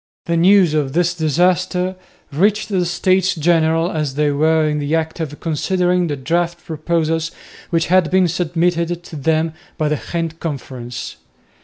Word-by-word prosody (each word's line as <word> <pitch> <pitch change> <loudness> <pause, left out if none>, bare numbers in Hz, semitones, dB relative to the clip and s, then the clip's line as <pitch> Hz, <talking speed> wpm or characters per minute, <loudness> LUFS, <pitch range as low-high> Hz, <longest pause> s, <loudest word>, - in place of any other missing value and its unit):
The 170 -2 0
news 180 -1 +5
of 145 -3 0
this 175 +1 +2
disaster 180 +3 +1 0.4
reached 210 +8 +1
the 185 -4 0
States 185 +2 +1
General, 165 +1 +2
as 150 -5 -2
they 150 0 +2
were 155 +2 +2
in 150 0 -1
the 145 +2 0
act 160 +1 -2
of 150 -3 -5
considering 180 +2 0
the 145 - -2
draft 170 +5 -2
proposals 165 -1 -1 0.4
which 165 -1 +1
had 185 -2 +3
been 185 0 +3
submitted 175 0 -1
to 165 - -10
them 160 +2 0 0.2
by 155 -2 0
the 150 - -1
Ghent 165 -1 -3
conference. 125 -6 -6
165 Hz, 155 wpm, -19 LUFS, 155-180 Hz, 0.4 s, news